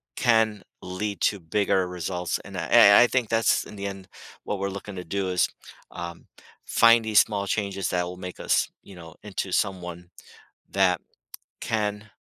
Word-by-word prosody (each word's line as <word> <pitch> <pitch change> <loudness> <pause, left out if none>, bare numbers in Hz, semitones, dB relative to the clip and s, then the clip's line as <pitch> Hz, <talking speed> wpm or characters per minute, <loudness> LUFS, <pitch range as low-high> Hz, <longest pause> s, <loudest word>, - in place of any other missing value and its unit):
can 110 -4 +2 0.2
lead 100 +3 -4
to 100 - +1
bigger 95 +2 0
results, 90 0 -3
and 95 -1 -8
I 85 -2 -3
I 100 -3 +8
I - - +4
think 125 -2 0
that's, 115 0 +2
in - - -11
the 100 0 -4
end, 95 -1 -8 0.4
what 105 - -3
we're 100 0 -1
looking 100 +1 -8
to 90 - -6
do 95 +2 -2
is, 90 -2 +2 0.4
um, 85 0 -8 0.4
find 115 0 +5
these 110 -1 +5
small 100 -2 +1
changes 100 -2 -2
that 90 -1 0
will 90 +1 -7
make 90 0 -8
us, - - +1
you 100 - -13
know, 80 -2 -12
into 100 -2 -4
someone 90 -3 -2 0.6
that 95 -3 +2 0.6
can 105 -1 -2
100 Hz, 170 wpm, -25 LUFS, 90-105 Hz, 0.6 s, I